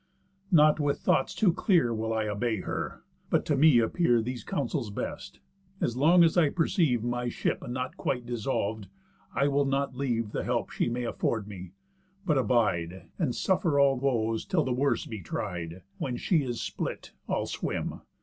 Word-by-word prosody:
Not 155 -2 +6
with 145 -1 +1
thoughts 135 - +1
too 190 -6 +3
clear 165 - +2
Will 110 0 -2
I 110 -1 0
obey 105 0 -1
her, - - -4 0.3
but - - +1
to 150 - +1
me 145 -1 +6
appear 120 +2 +3
These 120 0 -4
counsels 135 -3 -2
best: 100 - -6 0.4
As 120 - -1
long 165 +7 +6
as 165 - +3
I 165 -5 +4
perceive 155 - +1
My 120 0 -1
ship - - -2
not 125 +1 -4
quite 125 -2 -2
dissolv'd, 110 -3 -2 0.5
I 140 +2 +3
will 140 0 +2
not 135 -1 -1
leave 120 -5 -1
The - - -2
help - - -1
she - - 0
may 120 +1 -2
afford 115 -2 -1
me, 95 -3 -9 0.5
but 155 -6 +3
abide, 95 -7 0
And 145 -9 0
suffer 170 -6 +1
all 140 -1 +5
woes 115 -4 0
till 170 -4 +1
the 130 - -1
worst 135 +3 0
be 110 -4 -6
tried. 90 0 -5 0.2
When 125 -3 -2
she 165 +4 +2
is 120 -2 -3
split, - - -4 0.2
I'll - - 0
swim. - - -3
125 Hz, 175 wpm, -28 LUFS, 110-145 Hz, 0.5 s, Not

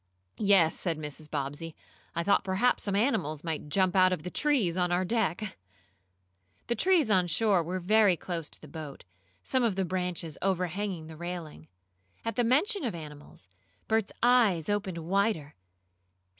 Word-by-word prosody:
"Yes," 195 -6 +4
said 170 -4 -1
Mrs. 150 0 -7
Bobbsey, 145 +4 -4 0.4
"I 170 - 0
thought 200 +3 +3
perhaps 195 +6 +1
some 200 -1 -1
animals 160 - 0
might 160 -3 -4
jump 185 +3 +2
out 185 -1 +5
of 180 -5 -2
the 180 - -5
trees 260 - +1
on 180 -1 +1
our 180 +1 +1
deck." 210 - -1 1.1
The 235 - 0
trees 320 - +3
on 185 -3 +4
shore 195 +2 +3
were 180 +3 -3
very 200 0 +4
close 165 -4 -5
to - - -12
the 155 - -13
boat, 150 -1 -8 0.4
some 260 - 0
of 230 -5 +1
the 190 -1 0
branches 180 -3 -3
overhanging 185 -1 -1
the 160 0 -10
railing. 170 - -7 0.6
At 230 -2 -2
the 245 - +2
mention 295 - +2
of 225 -8 -2
animals, 150 - -11 0.4
Bert's 220 -2 +1
eyes 225 -10 +4
opened 205 -4 -1
wider. 175 -2 0
185 Hz, 160 wpm, -29 LUFS, 160-210 Hz, 1.1 s, out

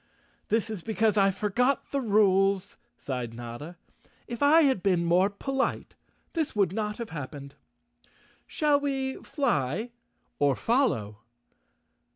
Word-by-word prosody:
"This 225 0 0
is 210 -5 -5
because 220 +2 +1
I 195 -1 +4
forgot 215 +7 0
the 280 - 0
rules," 200 -3 +2 0.2
sighed 125 -4 -5
Notta. 120 +8 -8 0.5
"If 235 -1 -6
I 300 +3 +6
had 265 -9 +2
been 180 -3 +2
more 180 +3 +3
polite 270 +7 -2 0.4
this 320 -6 -2
would 195 -4 +2
not 210 0 -2
have 235 -2 -6
hap¬ 145 -5 -5
pened. 140 -1 -9 1.0
Shall 295 -2 +2
we 270 -2 -2
fly 220 - -1 0.5
or 140 -2 +3
follow?" 115 - 0
205 Hz, 130 wpm, -27 LUFS, 170-255 Hz, 1.0 s, I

